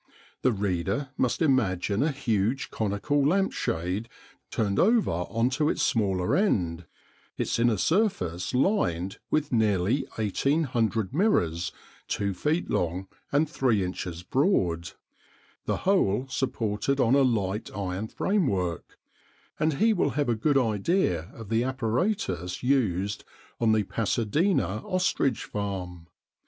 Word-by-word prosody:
The 130 - +3
reader 100 +5 -1
must 125 +6 0
imagine 105 - +1
a 155 +2 +2
huge 120 -2 -1
conical 110 +7 0
lamp 190 +7 +2
shade 90 +7 -2 0.4
turned 100 -3 0
over 225 +2 +4
on 115 +9 0
to 150 +3 +1
its - - 0
smaller 95 -7 +1
end, 90 - 0 0.5
its - - -1
inner 120 -2 +3
surface 95 - 0
lined 95 - +1
with 150 -1 0
nearly 110 +3 +2
1800 115 - 0
mirrors 90 - +1 0.4
2 100 -1 -1
feet 150 - -1
long 90 +3 -1 0.2
and 145 +3 +3
3 125 - +1
inches 90 -1 -5
broad, 90 - +1 0.7
the - - 0
whole 130 - +2
supported 130 0 -1
on 125 -1 +3
a 140 - +5
light 105 -5 0
iron 100 +1 -3
framework, 100 - -1 0.6
and 155 +1 +2
he 220 +7 +3
will 180 - +1
have 145 -4 +1
a - - +3
good 140 +6 +2
idea 105 - +1
of 110 -3 -9
the 115 +1 +2
apparatus 125 - -1
used 105 -7 +1 0.4
on 115 -2 +3
the 110 -1 +3
Pasadena 115 - 0
ostrich 180 -9 0
farm. 90 -4 -5
110 Hz, 125 wpm, -27 LUFS, 95-140 Hz, 0.7 s, a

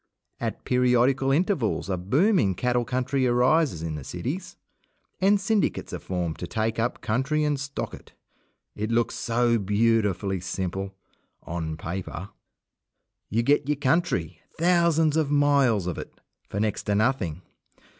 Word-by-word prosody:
At - - -4
periodical 125 +2 +3
intervals 155 - +1
a 95 - 0
boom 145 - +2
in 95 -3 +1
cattle 125 +3 0
country 130 +1 0
arises 125 - +2
in 80 -1 -3
the 75 -2 -6
cities, 135 - -5 0.6
and 200 +2 +4
syndicates 205 0 0
are - - -3
formed 90 -4 -3
to 90 - -4
take 110 +2 -1
up 120 +2 -1
country 135 +7 0
and 145 -2 0
stock 140 0 -4
it. - - -12 0.6
It 110 +1 -3
looks 115 0 +1
so 115 0 +1
beautifully 100 -2 +1
simple 95 +2 -4 0.5
on 80 -2 -4
paper. 90 +2 -5 1.0
You 115 +3 +1
get 145 +2 +2
your 150 - +1
country, 130 - 0 0.2
thousands 165 -2 +3
of 155 -3 +1
miles 140 -8 +3
of 90 -2 -3
it, - - -10 0.3
for 100 - -3
next 105 -2 -1
to 105 - +1
nothing. 100 - 0
120 Hz, 145 wpm, -26 LUFS, 95-145 Hz, 1.0 s, and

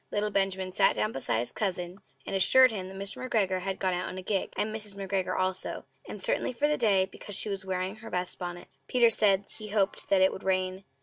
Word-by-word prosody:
Little 210 0 -1
Benjamin 190 -1 0
sat - - +3
down 105 +1 0
beside 130 -2 -1
his 120 +2 -1
cousin 180 -2 -3 0.3
and - - -3
assured 255 +6 +6
him 190 -4 -4
that 190 0 -9
Mr. 200 +5 -5
McGregor 195 -7 +1
had 190 0 -3
gone 185 -1 0
out 180 0 -2
in 185 - -7
a 185 - -6
gig, 195 0 -1
and 215 +1 -1
Mrs. 210 -2 -1
McGregor 195 -1 -2
also; 185 0 -2 0.2
and - - -7
certainly - - 0
for 290 +5 +1
the 300 - +2
day, 200 -7 +3
because 195 +1 -8
she 210 - -1
was 195 -1 -4
wearing 185 +2 -2
her 225 0 -10
best 180 0 0
bonnet. 175 -1 -6 0.2
Peter 240 -2 +4
said 200 -2 +3
he 215 - -6
hoped 205 -2 0
that 195 -1 +4
it 190 - +5
would - - -7
rain. 185 0 -1
195 Hz, 235 wpm, -29 LUFS, 185-210 Hz, 0.3 s, assured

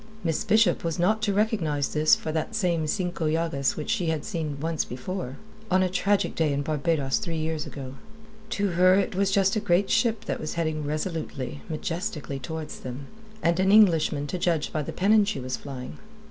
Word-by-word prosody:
Miss 165 -3 0
Bishop 220 +1 +3
was 165 -2 -2
not 210 +5 +2
to 215 -2 +1
recognize 195 -9 0
this 155 0 +4
for 155 - -4
that 155 0 -2
same 170 -3 +1
Cinco 175 -2 -1
Llagas 155 -4 0
which 155 - -3
she 195 -7 0
had 160 -2 -1
seen 155 -7 -3
once 160 +1 -1
before 130 +1 -5 0.3
on 185 0 +4
a 185 - +1
tragic 200 +2 +1
day 160 -3 +1
in 140 0 -1
Barbados 150 -1 0
three 170 -6 -3
years 155 -1 -2
ago. 130 -2 -7 0.6
To 200 -1 0
her 185 +1 +5
it 195 0 +1
was 195 +1 +1
just 195 0 +3
a - - +2
great 195 -1 +2
ship 225 -1 +2
that - - -2
was 155 - -4
heading 155 -3 -1
resolutely, 150 - -4
majestically, 160 -3 -3
towards 160 +2 -6
them, 130 +2 -7 0.3
and 170 +1 +2
an 190 +1 +3
Englishman 165 -8 +5
to 175 +5 -4
judge 165 -4 0
by 155 - 0
the 145 - -5
pennon 210 +3 +4
she 200 -6 -2
was 130 0 -3
flying. 130 -3 -8
165 Hz, 195 wpm, -26 LUFS, 150-190 Hz, 0.6 s, her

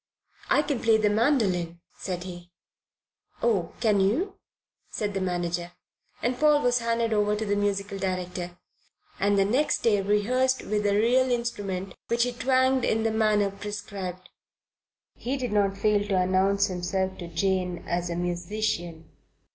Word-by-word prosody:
"I 295 - +4
can 285 -4 -2
play 225 -1 +4
the 210 -1 +2
mandoline," 205 - +1 0.2
said 180 -2 -4
he. 175 -1 -9 0.9
"Oh, 200 -8 +1
can 215 -4 +3
you?" 265 - 0 0.5
said 205 -1 -3
the 195 - -2
manager, 175 -1 -2 0.5
and 245 +1 0
Paul 300 -1 +4
was 245 0 +3
handed 230 -1 0
over 210 0 +2
to 220 +1 -3
the 205 0 0
musical 200 -1 -1
director, 180 -1 -3 0.6
and 200 +1 +2
the 195 - +4
next 280 +8 +1
day 210 -3 +3
rehearsed 250 +6 +1
with 210 0 0
a 200 - +2
real 250 +5 +3
instrument 200 -6 -2
which 235 0 +2
he 245 - 0
twanged 260 +1 +2
in 220 0 +1
the 225 - +1
manner 215 -2 +2
prescribed. 200 -3 -6 0.8
He 260 +4 -3
did 250 -4 -3
not 200 -1 +2
fail 210 0 +2
to 195 -2 +1
announce 190 +2 +3
himself 190 0 -2
to 175 - -6
Jane 180 +1 -1
as 175 0 -1
a 170 - -2
musician. 175 -1 -3
205 Hz, 155 wpm, -26 LUFS, 185-230 Hz, 0.9 s, I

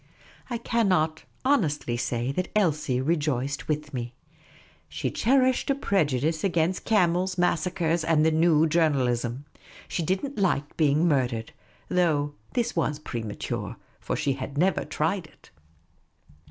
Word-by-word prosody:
I 240 - -2
cannot 185 -10 +1 0.2
honestly 155 - +1
say 120 +1 -1
that 185 +6 -2
Elsie 155 -10 +1
rejoiced 140 -2 -1
with 150 -1 -2
me. 120 -1 -5 0.7
She - - -3
cherished 260 +2 +2
a 275 - +3
prejudice 160 - 0
against 175 -1 0
camels, 185 -3 +2
massacres, 175 -1 +1
and 155 -1 +3
the 160 - +4
new 160 -1 +4
journalism. 135 -6 +1 0.4
She - - -2
did 190 - 0
n't 280 -4 -6
like 150 -7 0
being 155 +2 +3
murdered; 125 -7 0 0.4
though 150 -5 +1 0.2
this 240 0 -1
was 150 -3 0
premature, 115 -8 -5 0.2
for - - -3
she 140 - 0
had 135 +2 -6
never 185 +4 +2
tried 160 +3 -1
it. - - -23
160 Hz, 130 wpm, -26 LUFS, 140-180 Hz, 0.7 s, the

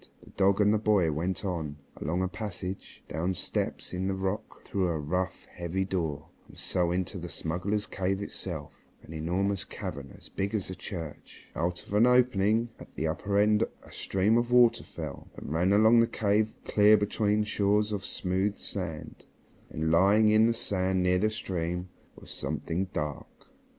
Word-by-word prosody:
The - - -16
dog 100 +1 +3
and 105 0 +5
the 110 - +2
boy 100 -6 +3
went 90 +7 -2
on, 80 -6 -3 0.2
along 85 +5 -1
a - - +1
passage, 95 -2 -6
down 85 +4 -1
steps - - -2
cut - - -5
in 95 +1 -1
the 95 - 0
rock, 95 +2 -4
through 95 -2 0
a 85 -2 -1
rough, 90 +5 -2
heavy 90 +2 -3
door, 85 -7 -3 0.2
and - - -16
so 90 -1 0
into 90 +2 -2
the 85 0 -6
smugglers' 95 +7 -1
cave 95 -1 -1
itself, 85 -6 -4 0.3
an 80 - -10
enormous 90 +5 -1
cavern 70 -1 -7
as - - -13
big 100 +3 -2
as 95 -3 -1
a - - -5
church. 80 -7 -8
Out 85 +2 -2
of - - -9
an 110 +4 +5
opening 120 -2 +3
at - - -13
the 80 - -2
upper 95 +6 -1
end 105 +1 +4 0.2
a - - -15
stream 100 +5 +2
of 120 0 -2
water 125 -1 +5
fell, - - -7
and 75 - -6
ran 90 +4 +2
along 110 +3 +6
the 115 - +5
cave 105 0 +1
clear 105 +1 +6
between 105 +1 +1
shores 105 0 +1
of 100 -2 -2
smooth 95 +3 -1
sand. 85 -6 -6 0.4
And, 80 +1 -1
lying 100 +5 +5
on 110 +1 +6
the 115 - +1
sand 95 -3 0
near 90 0 +3
the 110 +3 +2
stream, 90 -3 -3 0.3
was - - -12
something 90 +4 -2
dark. 75 -6 -4
95 Hz, 180 wpm, -29 LUFS, 85-105 Hz, 0.4 s, along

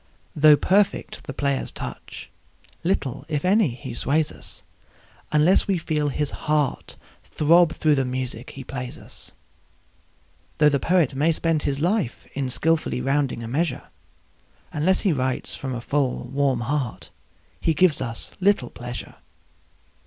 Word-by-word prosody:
Though 150 0 +7
perfect 200 +5 +1
the - - -5
player's 140 -1 0
touch, - - -8 0.5
little, 145 -7 -1
if 150 +1 -2
any, 200 +1 +4
he 130 -1 -7
sways 145 +5 +1
us, - - -5 0.7
Unless 155 +5 +4
we 195 -2 +2
feel 155 -3 -1
his 145 +1 -1 0.2
heart 150 -3 0 0.3
throb 170 +2 +4
through 155 -2 +2
the 135 -2 +2
music 125 -2 -4
he 135 - -8
plays 125 -1 -6
us. - - -10 1.2
Though 150 -1 +6
the 140 -1 +1
poet 165 -3 +2
may 150 +5 +2
spend 165 -1 0
his 140 -1 -1
life 175 - 0
in 135 -2 -2
skilfully 160 0 +1
rounding 135 -2 0
a - - -5
measure, 155 +7 -2 0.8
Unless 170 +5 +2
he 195 -6 +2
writes 130 -2 -2
from 130 -2 -4
a 120 - -4
full, 140 0 0
warm 135 -3 0
heart 130 -1 -3 0.5
he 160 - +1
gives 155 -3 +4
us 115 -3 -4
little 190 -10 +2
pleasure. 120 0 -7
145 Hz, 145 wpm, -24 LUFS, 130-165 Hz, 1.2 s, Though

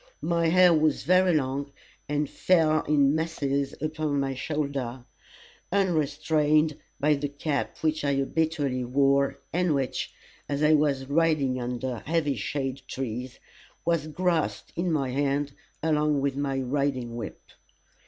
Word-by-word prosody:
My 170 -1 +1
hair 180 +1 +6
was 155 -2 +2
very 185 +1 +4
long, 140 0 -1 0.4
and 150 0 0
fell 155 -3 +3
in 145 -2 +3
masses 140 -4 -1
upon 155 -1 -1
my 135 -1 -1
shoulder, 130 -3 -3 0.7
unrestrained 155 -4 +2 0.2
by 150 +2 +3
the 145 0 -1
cap 145 0 -3
which 155 -1 0
I 140 -1 +1
habitually 140 -2 0
wore, 140 +2 +2 0.2
and 175 -3 +2
which, 135 -2 -2 0.4
as 145 +1 -1
I 155 +1 +5
was 145 -3 +2
riding 140 -3 +1
under 125 0 -3
heavy 155 -2 0
shade 135 +4 -3
trees, 125 0 -5 0.5
was 165 -2 +1
grasped 170 0 -1
in 175 +1 0
my 135 -5 0
hand 140 +1 0 0.3
along 150 -2 +2
with 135 -1 0
my 140 -1 -1
riding 130 -2 -1
whip. 115 -3 -8
145 Hz, 135 wpm, -27 LUFS, 135-155 Hz, 0.7 s, hair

